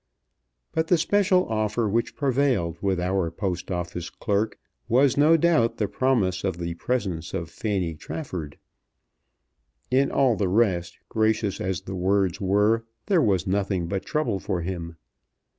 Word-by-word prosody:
But 160 0 0
the 175 - +4
special 185 +1 +2
offer 110 +1 0
which 115 +3 -1
prevailed 125 - +1
with 95 -2 0
our 90 -1 0
Post 90 0 -4
Office 90 -2 -4
clerk 105 0 -1 0.3
was 130 +2 +4
no 155 +3 +5
doubt 160 -8 +2
the 105 - 0
promise 100 -7 +1
of 95 -3 -1
the 85 -1 -3
presence 90 -5 -2
of 85 -3 -4
Fanny 95 -6 -2
Trafford. 85 - -6 1.3
In 135 +2 +3
all 130 -4 +3
the 100 -3 0
rest, 95 -4 +1
gracious 110 -2 0
as 95 -2 -2
the 95 - -7
words 95 0 +1
were, 105 +4 +2 0.2
there 185 -5 +3
was 100 - +2
nothing 95 -2 0
but 95 +3 -3
trouble 125 -10 -1
for 95 -2 -2
him. 85 -2 -5
100 Hz, 145 wpm, -25 LUFS, 90-120 Hz, 1.3 s, no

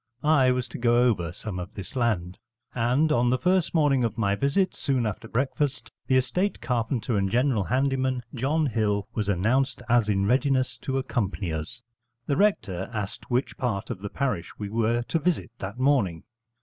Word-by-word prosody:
I 145 -4 +4
was 125 -1 0
to - - -7
go 120 0 +4
over 90 -9 +1
some 95 0 -6
of 90 +3 -7
this 100 +4 -8
land: 105 -7 0 0.3
and, 125 +6 +2
on 120 -3 +3
the 130 - +2
first 180 +2 +1
morning 145 -5 +3
of 115 -1 -1
my 100 -3 +1
visit, 140 - +1
soon 130 -5 0
after 105 -3 -4
breakfast, 130 0 -1 0.2
the 130 - +3
estate 180 +11 0
carpenter 120 -1 -1
and 95 -1 +1
general 120 -2 +2
handyman, 130 0 0
John 145 +5 +1
Hill, 105 -5 0
was 105 -3 -2
announced 120 +8 +1
as 120 -3 +3
in 100 -1 +2
readiness 130 0 +1
to 135 0 -2
accompany 105 -9 -2
us. 80 +11 -6 0.4
The 140 - 0
rector 100 - +1
asked 105 -4 -5
which 125 +2 -1
part 115 -7 -2
of - - -5
the 100 +1 -5
parish 125 -11 -2
we 105 -1 -5
were 115 +2 +1
to 165 - -1
visit 165 -6 -1
that 100 +4 -6
morning. 125 - +1
120 Hz, 180 wpm, -26 LUFS, 105-135 Hz, 0.4 s, I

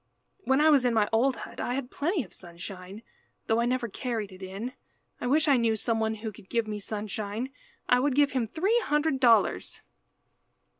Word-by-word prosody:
When 265 +1 +3
I 310 +1 +6
was 280 -4 +5
in 245 -2 +2
my 210 -2 +3
old 245 +4 +3
hut - - -9
I 245 - -1
had 265 -2 -4
plenty 330 +1 0
of 190 - -16
sunshine, 185 +4 -9 0.4
though 225 +1 +2
I 235 - +2
never 250 -1 0
carried 220 -2 -4
it 185 0 -13
in. 195 +7 -5 0.5
I - - -3
wish 305 +4 +3
I 280 -3 +5
knew 230 -2 +2
some 225 +1 0
one 220 0 0
who 220 +1 -5
would 190 -2 -14
give 230 -1 +1
me 210 -1 -4
sunshine. 215 +3 -4 0.4
I 250 - +5
would 270 0 +1
give 285 0 +4
him 255 -4 0
three 390 - +2
hundred 295 -1 +1
dollars." 225 - +3
235 Hz, 200 wpm, -28 LUFS, 210-265 Hz, 0.5 s, I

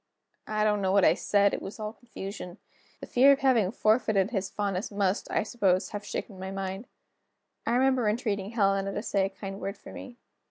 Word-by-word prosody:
I 215 0 0
don't 210 -1 +2
know 190 -1 +1
what 195 -1 +5
I - - +6
said; 200 -1 +2
it - - -2
was 195 - -8
all 215 0 -4
confusion. 195 -6 -8 0.4
The - - -5
fear 265 +3 +5
of 280 - +2
having 245 -8 +3
forfeited 215 -2 +2
his 195 -4 -2
fondness 200 -1 -2
must, 200 -1 -1
I - - +1
suppose, 195 -5 +1
have 205 0 -5
shaken 200 -2 -5
my 190 0 -5
mind. 195 +3 -5 0.8
I 230 - +2
remember 255 -3 +3
entreating 210 -3 -1
Helena 195 -3 +1
to 205 - -3
say 195 -4 +1
a - - -8
kind 195 0 -7
word 200 +1 -4
for - - -12
me. 245 -2 -9
205 Hz, 200 wpm, -28 LUFS, 195-225 Hz, 0.8 s, I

